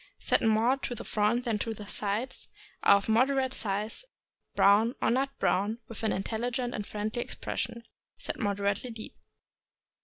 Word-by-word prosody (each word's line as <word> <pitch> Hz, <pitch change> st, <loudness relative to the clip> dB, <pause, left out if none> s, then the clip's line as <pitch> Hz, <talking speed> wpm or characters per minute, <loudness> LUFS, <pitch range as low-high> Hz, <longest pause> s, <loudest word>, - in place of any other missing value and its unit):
— -, -, -50 dB
Set -, -, +4 dB
more 225 Hz, +4 st, +3 dB
to 255 Hz, -2 st, -4 dB
the -, -, -7 dB
front 215 Hz, +4 st, +1 dB
than 225 Hz, -3 st, 0 dB
to 225 Hz, +1 st, -2 dB
the 210 Hz, -, -8 dB
sides; 210 Hz, +4 st, -3 dB, 0.3 s
are 200 Hz, -, +7 dB
of 200 Hz, -, -4 dB
moderate 260 Hz, +3 st, +3 dB
size, 210 Hz, -, -2 dB, 0.5 s
brown 210 Hz, +5 st, +5 dB
or -, -, +2 dB
nut 265 Hz, +3 st, +2 dB
brown, 205 Hz, +4 st, +1 dB
with 230 Hz, -, -8 dB
an 220 Hz, -, +1 dB
intelligent 240 Hz, +5 st, -2 dB
and 210 Hz, -, -4 dB
friendly 215 Hz, +3 st, -2 dB
expression; 235 Hz, 0 st, -4 dB, 0.3 s
set -, -, -4 dB
moderately 200 Hz, +1 st, 0 dB
deep. 225 Hz, -2 st, -8 dB
220 Hz, 160 wpm, -29 LUFS, 210-245 Hz, 0.5 s, are